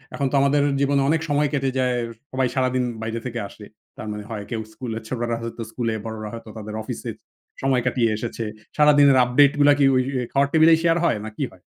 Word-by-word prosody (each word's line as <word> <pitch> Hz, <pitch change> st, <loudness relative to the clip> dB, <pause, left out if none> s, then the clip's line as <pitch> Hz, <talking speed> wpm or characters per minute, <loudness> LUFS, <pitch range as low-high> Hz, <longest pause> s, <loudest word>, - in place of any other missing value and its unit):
এখন 140 Hz, -2 st, 0 dB
তো -, -, 0 dB
আমাদের 140 Hz, +1 st, +3 dB, 0.2 s
জীবনে 140 Hz, 0 st, +2 dB
অনেক 160 Hz, 0 st, +2 dB
সময় 145 Hz, +1 st, +2 dB
কেটে 135 Hz, -2 st, 0 dB
যায়। 125 Hz, -1 st, +1 dB, 0.4 s
সবাই 130 Hz, 0 st, +1 dB
সারাদিন 130 Hz, -1 st, +1 dB, 0.2 s
বাইরে 115 Hz, +1 st, -3 dB
থেকে 120 Hz, -2 st, -4 dB
আসে। 105 Hz, -, -13 dB, 0.3 s
তার 110 Hz, -, -7 dB
মানে 105 Hz, 0 st, -6 dB
হয় 105 Hz, -2 st, -5 dB
কেউ 115 Hz, -, -2 dB
স্কুলে, 115 Hz, -3 st, -5 dB
ছোটরা 120 Hz, -1 st, -2 dB
হয়তো 115 Hz, 0 st, -6 dB
স্কুলে, 115 Hz, -2 st, -2 dB
বড়রা 110 Hz, -1 st, -5 dB
হয়তো 115 Hz, -1 st, -9 dB
তাদের 105 Hz, 0 st, -7 dB
অফিসে -, -, -6 dB, 0.5 s
সময় 130 Hz, -2 st, +2 dB
কাটিয়ে 120 Hz, -2 st, +1 dB
এসেছে। 115 Hz, 0 st, -4 dB, 0.3 s
সারাদিনের 145 Hz, -2 st, +6 dB
আপডেইটগুলা 145 Hz, +3 st, +4 dB
কি 140 Hz, -, +5 dB
ওই, 130 Hz, -, +3 dB, 0.2 s
ওই 125 Hz, -, -2 dB
খাওয়ার 140 Hz, 0 st, +2 dB
টেবিলেই 160 Hz, 0 st, +6 dB
শেয়ার 165 Hz, 0 st, +3 dB
হয়, 170 Hz, -, +2 dB
না 110 Hz, -, -5 dB
কি 145 Hz, -, -1 dB
হয়? 90 Hz, -, -19 dB
130 Hz, 205 wpm, -23 LUFS, 115-140 Hz, 0.5 s, সারাদিনের